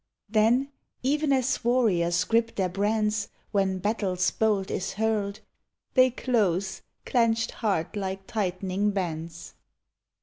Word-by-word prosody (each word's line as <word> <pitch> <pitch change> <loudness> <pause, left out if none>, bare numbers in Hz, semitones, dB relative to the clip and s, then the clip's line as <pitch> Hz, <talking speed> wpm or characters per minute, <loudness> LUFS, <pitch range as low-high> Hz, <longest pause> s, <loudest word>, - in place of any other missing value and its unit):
Then, 230 +6 +2 0.3
even 295 +2 +1
as 260 -1 +1
warriors 205 -9 +2
grip 230 0 +1
their 190 -2 0
brands 210 +2 0 0.2
When 195 -2 +1
battle's 190 -2 0
bolt 210 -3 0
is 190 - -2
hurled, 215 -1 -1 0.5
They 255 -1 +6
close, 195 -8 0 0.2
clenched 230 -2 +2
hard 200 -4 -1
like 195 -1 -4
tightening 195 0 -1
bauds. 165 -3 -4
210 Hz, 110 wpm, -27 LUFS, 190-230 Hz, 0.5 s, They